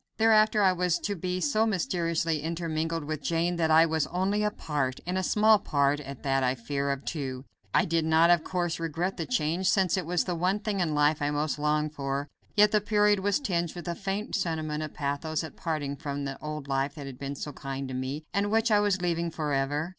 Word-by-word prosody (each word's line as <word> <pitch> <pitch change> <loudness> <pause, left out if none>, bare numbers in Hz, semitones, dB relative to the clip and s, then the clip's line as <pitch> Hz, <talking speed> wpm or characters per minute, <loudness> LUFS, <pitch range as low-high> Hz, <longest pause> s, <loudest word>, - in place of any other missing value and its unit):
Thereafter 215 -1 +4
I 190 -1 +5
was 180 -1 +1
to 205 - -3
be 180 +1 -2
so 225 0 +2
mysteriously 170 -5 0
intermingled 165 0 -2
with 155 0 -4
Jane 170 +3 0
that 160 -1 +1
I 160 +1 +7
was 160 -2 0
only 190 +4 0
a 210 - +2
part 145 -9 -2
and 180 +1 -2
a 185 - +1
small 215 +2 +4
part 140 -4 +1
at 140 -2 -9
that 135 -1 +1
I 125 0 +1
fear 140 +3 -2
of 140 0 -3
two. 135 -4 -4 0.3
I - - +3
did 165 0 +1
not, 160 +2 +5
of 170 -2 +4
course, 175 -2 -2
regret 165 +3 -2
the 165 - -3
change, 180 -5 +1
since 190 -2 +2
it 180 -4 -3
was 175 0 +1
the 180 - -2
one 180 +4 +1
thing 210 -1 -3
in 160 -4 0
life 150 +1 +3
I 145 - +1
most 150 0 -1
longed 150 0 0
for, 140 0 -3 0.3
yet 210 0 +6
the 210 - +3
period 210 -1 +3
was 200 +5 +1
tinged 175 - -1
with 175 0 -8
a 170 - -1
faint 195 +4 -3
sentiment 155 -5 -2
of 155 -1 -6
pathos 150 +2 -2
at 160 - -8
parting 150 -4 -3
from 140 -1 -4
the 135 -1 -5
old 150 -2 -5
life 135 +1 -1
that 145 -3 -7
had 135 -2 -9
been 140 0 -4
so 145 +1 -6
kind 135 0 -5
to 130 - -6
me, 130 +4 -3
and 200 +1 +1
which 225 +2 +2
I 210 - +5
was 200 -3 +1
leaving 170 -1 0
forever. 150 0 -1
165 Hz, 230 wpm, -28 LUFS, 145-185 Hz, 0.3 s, I